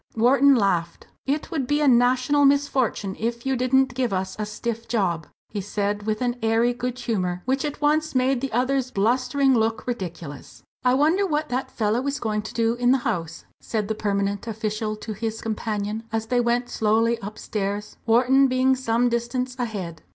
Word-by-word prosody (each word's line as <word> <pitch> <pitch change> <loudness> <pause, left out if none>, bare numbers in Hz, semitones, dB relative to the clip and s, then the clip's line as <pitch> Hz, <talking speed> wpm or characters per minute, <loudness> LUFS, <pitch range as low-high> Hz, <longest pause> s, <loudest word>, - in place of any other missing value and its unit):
Wharton 270 +4 +5
laughed. 180 -6 0 0.2
"It 290 +2 -1
would 280 -7 -1
be 290 +2 +1
a 300 - +2
national 255 +3 +4
misfortune 270 -8 +1
if 235 +2 -3
you 265 0 +1
didn't 255 +1 +2
give 250 -2 -1
us 190 0 -2
a 210 - -2
stiff 230 +2 -4
job," 180 -9 0 0.2
he 205 - -4
said, 205 +1 -2
with 215 +2 0
an 245 0 -1
airy 225 +2 +2
good 250 0 -4
humour 185 -7 -2
which 265 +1 0
at 295 -1 -4
once 305 0 +1
made 255 0 +2
the 270 - -3
other's 255 +2 +1
blustering 255 +5 +2
look 225 -1 0
ridiculous. 170 - -6 0.2
"I 250 0 +4
wonder 325 +8 +3
what 305 -2 -1
that 255 +2 -2
fellow 225 +4 0
is 280 +1 -1
going 215 -2 -1
to 220 - -8
do 230 -1 +2
in 245 0 +1
the 265 - +5
House," 165 -1 -3
said 215 -2 -3
the - - +1
permanent 200 0 -1
official 215 -1 -2
to 215 +1 -6
his 225 +1 -4
companion 215 -1 -3
as 225 0 -1
they 245 +2 +1
went 240 +1 0
slowly 225 +2 +2
upstairs, 205 0 -4
Wharton 255 +4 +5
being 260 +1 +3
some 245 -1 +1
distance 245 +2 -2
ahead. 190 -9 -4
235 Hz, 180 wpm, -24 LUFS, 210-255 Hz, 0.2 s, Wharton